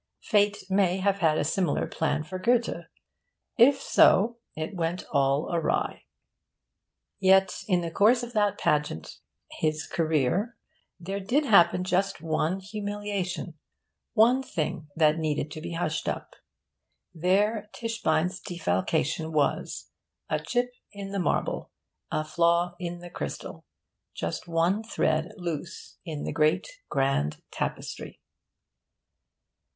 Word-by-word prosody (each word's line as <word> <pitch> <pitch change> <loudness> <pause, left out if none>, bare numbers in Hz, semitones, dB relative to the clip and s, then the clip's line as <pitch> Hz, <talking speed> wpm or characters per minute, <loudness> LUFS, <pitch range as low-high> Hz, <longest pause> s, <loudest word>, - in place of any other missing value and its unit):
Fate 205 0 +2
may 190 -1 +2
have 200 +1 +1
had 160 -4 +3
a - - +1
similar 160 +1 0
plan 155 -1 -1
for 185 +4 -6
Goethe; 235 +4 +1 0.7
if 270 +3 +6
so, 235 -3 +4 0.2
it 155 +4 -4
went 170 +1 -2
all 140 +2 +1
agley. 170 - -1 1.1
Yet, 190 -1 +4
in 180 -4 +2
the 170 -1 -4
course 230 +7 +4
of 240 0 -7
that 205 -2 +2
pageant, 150 - -1 0.3
his 155 0 -1
career, 165 - 0 0.4
there 195 +3 -4
did 250 +10 +1
happen 180 -5 +5
just 190 +2 0
one 160 +3 0
humiliation 205 -4 -4 0.6
one 240 +4 +5
thing 155 - -3
that 155 0 +3
needed 155 -1 -1
to 155 - -7
be 170 - -5
hushed 160 -2 -1
up. - - -5 0.8
There 205 +5 +1
Tischbein's 185 -6 -1
defalcation 160 - -1
was; 150 -2 -1 0.4
a - - +2
chip 245 0 -1 0.2
in 200 -1 -7
the 200 - -2
marble, 180 - -1 0.4
a 155 - -1
flaw 170 +2 +2
in 175 -1 -5
the 175 0 -10
crystal, 70 - -6 0.5
just 85 - -4
one 170 +5 +2
thread 160 -6 0
loose 170 -1 -6
in 155 -5 -5
the - - -3
great 155 - +2 0.2
grand 135 - 0
tapestry. - - -5
175 Hz, 125 wpm, -27 LUFS, 155-205 Hz, 1.1 s, if